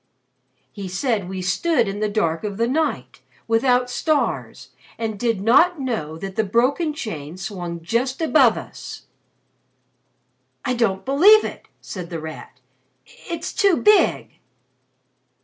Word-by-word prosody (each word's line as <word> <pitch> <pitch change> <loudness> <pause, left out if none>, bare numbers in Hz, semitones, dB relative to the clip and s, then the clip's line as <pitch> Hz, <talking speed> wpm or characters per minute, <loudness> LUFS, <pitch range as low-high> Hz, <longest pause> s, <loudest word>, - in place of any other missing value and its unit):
He 200 -3 -7
said 200 0 -1
we 190 -1 -5
stood 240 - +1
in 195 +1 -4
the 215 0 0
dark 165 -6 -1
of 205 -2 -4
the 230 +1 +1
night 310 +5 -2 0.3
without 245 +2 +2
stars 300 +4 -2 0.3
and 220 -3 -4
did 230 -5 0
not 310 - +4
know 220 - -3
that 195 +3 -7
the 220 - +1
broken 255 - +1
chain 175 - -6
swung 175 -4 -6
just 245 +8 -1
above 295 -8 +4
us." - - -9 1.6
"I 255 - +1
don't 195 -6 0
believe 385 +11 +6
it!" - - -7
said 180 -3 -7
The 165 -2 -5
Rat. 155 -4 -9 0.4
"It's 335 -1 -7
too 395 -6 +3
big!" 420 -4 +3
225 Hz, 130 wpm, -22 LUFS, 190-275 Hz, 1.6 s, believe